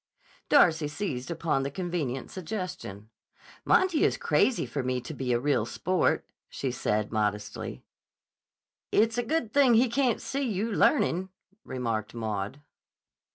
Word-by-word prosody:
Darcy 165 - +5
seized 145 -5 -4
upon 165 -4 0
the 135 - -2
convenient 150 -6 -3
suggestion. 165 - -6 0.5
"Monty 370 -5 +3
is - - +2
crazy 255 - +2
for 140 - -3
me 125 0 -1
to 125 +6 -7
be 130 -3 -2
a 120 - +2
real 145 +3 +1
sport," 185 -1 0 0.2
she 135 - -3
said 105 -3 -1
modestly. 105 -1 -2 1.1
"It's 230 +2 +3
a - - +1
good 235 -2 -1
thing 270 -4 +5
he 245 +3 +5
can't 250 -2 +1
see 275 - -3
you 210 +3 -1
learning," 190 - +2 0.3
remarked 115 -4 -3
Maud. 110 +3 -3
155 Hz, 135 wpm, -28 LUFS, -, 1.1 s, Darcy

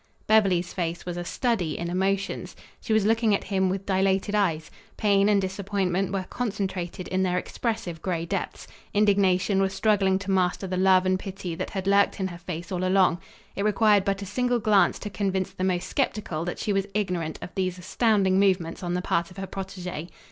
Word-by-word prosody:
Beverly's 195 -5 +3
face 170 -1 -3
was 175 -1 -4
a 175 - -4
study 180 - -1
in 170 - -3
emotions. 190 +2 -1 0.2
She - - -6
was 220 -2 +3
looking 225 -1 +3
at - - -3
him 190 -2 0
with 195 +1 -3
dilated 190 +1 +1
eyes. 165 -7 0 0.3
Pain 200 -1 +3
and 205 -1 +4
disappointment 190 -1 -1
were 195 -2 -2
concentrated 190 -6 -3
in 185 0 0
their 180 -1 +1
expressive 185 -6 -3
gray 170 -3 -2
depths; - - -4 0.3
indignation 195 -1 +3
was 195 0 0
struggling 195 -3 +3
to 195 0 -4
master 185 0 +1
the 185 0 -3
love 185 0 +4
and 185 0 +2
pity 190 -3 -6
that 165 - -4
had 190 -3 -4
lurked 200 +1 +3
in 190 -1 -1
her 175 -1 -9
face 170 0 -6
all 180 -1 -2
along. 185 -2 +3 0.4
It - - -2
required 210 -1 +4
but 195 0 -1
a - - -5
single 245 +5 0
glance 210 -3 +3
to 210 - -7
convince 190 -1 -1
the 185 - -5
most 180 -2 0
skeptical 210 - -2
that 175 - -4
she 210 - -1
was 195 0 0
ignorant 180 -6 -1
of - - -8
these 185 -2 -1
astounding 190 0 +2
movements 185 -4 +1
on 175 -1 -2
the 180 - -2
part 170 0 0
of 180 - -15
her 195 - -4
protege. 180 -4 -6
190 Hz, 200 wpm, -26 LUFS, 180-200 Hz, 0.4 s, and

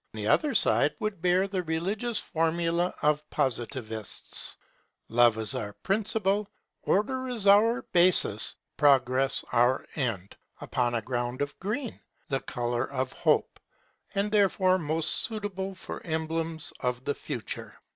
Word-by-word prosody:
The 105 -1 -4
other 295 -3 +3
side 145 +1 +4
would 215 -5 -4
bear 180 +2 +3
the 190 -2 -2
religious 195 +8 -1
formula 170 +1 0
of 150 0 +1
Positivists: 115 -4 -2 0.5
Love 120 -1 +4
is 110 -3 -1
our 105 0 -4
Principle, 205 - 0 0.3
Order 260 +6 0
is 235 -5 -2
our 210 +4 +5
Basis, 170 - +3 0.2
Progress 135 -2 +3
our 120 +2 +3
End, 110 - -3 0.2
upon 120 -1 -1
a 115 - -1
ground 120 +1 -2
of 145 - -6
green, 220 +6 -4 0.3
the 135 -2 0
colour 120 -1 -2
of 130 0 -2
hope, - - +1 0.6
and 200 +1 0
therefore 190 -3 +3
most 160 0 -1
suitable 195 -3 -3
for 185 - -8
emblems 160 -1 -2
of 125 0 -2
the 145 - 0
future. - - -6
160 Hz, 130 wpm, -28 LUFS, 125-195 Hz, 0.6 s, our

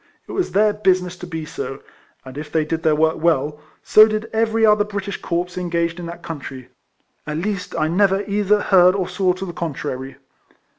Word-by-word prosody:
It - - -8
was 375 - -2
their 210 +1 +4
business 185 -3 +1
to 180 - -8
be 160 -2 -5
so; - - -6 0.4
and 130 0 -10
if 150 0 -7
they 155 -1 +1
did 160 +1 -2
their 155 -2 +3
work 160 +1 +2
well, 150 -2 +1 0.2
so 215 0 +7
did 215 +1 -3
every 225 0 +2
other 210 -1 +5
British 200 -1 -5
corps 175 +1 -2
engaged 170 -1 -1
in 170 - -6
that 170 0 -9
country, 135 -5 -8 0.6
at 150 0 -3
least 195 +2 -3
I 155 -1 +1
never 195 +3 +2
either 205 +1 +1
heard 185 -1 +5
or 190 -3 -1
saw 185 -2 +1
to 185 +1 -6
the 175 - -7
contrary. 135 -5 -5
180 Hz, 195 wpm, -20 LUFS, 160-205 Hz, 0.6 s, so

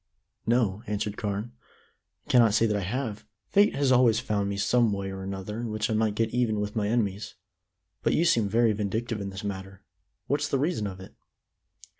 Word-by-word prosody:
"No," 110 -4 +2
answered 105 0 -2
Carne, 105 +3 -3 0.7
"I - - -24
cannot 115 -4 +5
say 115 - +4
that 105 -2 +1
I - - 0
have. 110 +2 -3 0.3
Fate 205 +1 +4
has 140 -1 +2
always 120 -3 +5
found 100 -1 -1
me 100 - -3
some 120 +2 +3
way 100 -1 -3
or 95 0 -6
another 95 +3 -5
in 120 - -3
which 110 +1 -1
I - - +1
might 110 -1 +1
get 115 0 0
even 120 -4 +1
with 105 0 -3
my 105 -2 0
enemies. 105 -3 -1 0.7
But - - +1
you 170 - +2
seem 115 -10 +3
very 115 +1 +3
vindictive 110 +2 -2
in 100 - -4
this 95 +1 -7
matter. 95 -1 -6 0.4
What's 145 +1 0
the 140 - +1
reason 140 - 0
of 95 -1 -7
it?" 95 - -12
105 Hz, 200 wpm, -27 LUFS, 100-120 Hz, 0.7 s, cannot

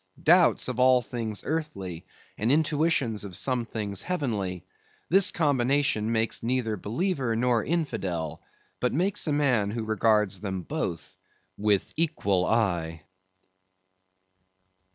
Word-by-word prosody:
Doubts 175 +1 +5
of 125 -1 -3
all 125 -1 +5
things 110 -3 -4
earthly, 95 - -4 0.3
and 110 +4 0
intuitions 150 -6 +1
of 95 -4 -5
some 125 0 -1
things 100 -4 -3
heavenly; 105 - -3 0.4
this 190 +2 +6
combination 135 -6 +1
makes 115 0 0
neither 115 -2 -1
believer 125 - -2
nor 120 -1 +1
infidel, 90 - -2 0.4
but 125 - 0
makes 195 +3 +1
a - - +1
man 130 -8 +2
who 115 +2 -3
regards 110 -3 +1
them 95 -2 -4
both 90 - -4 0.4
with 105 -2 0
equal 100 - +1
eye. 85 -8 0
115 Hz, 115 wpm, -27 LUFS, 100-145 Hz, 0.4 s, this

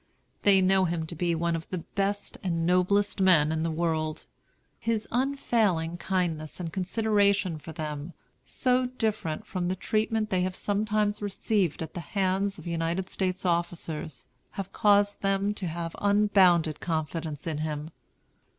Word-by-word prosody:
They 195 -2 +5
know 190 0 +4
him 165 -2 -1
to 170 - -7
be 170 +1 0
one 170 +1 0
of 165 - -6
the 185 - -3
best 200 +4 -3
and 170 -3 -1
noblest 190 +3 +2
men 160 -5 +5
in 160 0 -1
the 165 - 0
world. 160 -1 -1 0.5
His 225 -2 -1
unfailing 225 -10 +1
kindness 175 -5 -2
and 165 -3 -5
consideration 200 -3 +1
for 160 - -9
them, 155 +1 -5 0.3
so 255 -1 +1
different 215 -10 -2
from 185 -2 -3
the 185 - 0
treatment 215 +2 0
they 185 -1 +2
have 185 0 -1
sometimes 210 +1 0
received 200 -4 0
at 160 - -8
the - - -4
hands 195 +4 -1
of - - -11
United 170 +2 -2
States 185 -1 -2
officers, 170 -3 -2 0.3
have 195 -1 -6
caused 205 -1 +3
them 195 +1 +1
to 200 -3 -4
have 165 0 -4
unbounded 195 -6 +4
confidence 160 -2 -3
in 160 -3 -2
him. 155 0 -3
185 Hz, 150 wpm, -28 LUFS, 165-205 Hz, 0.5 s, They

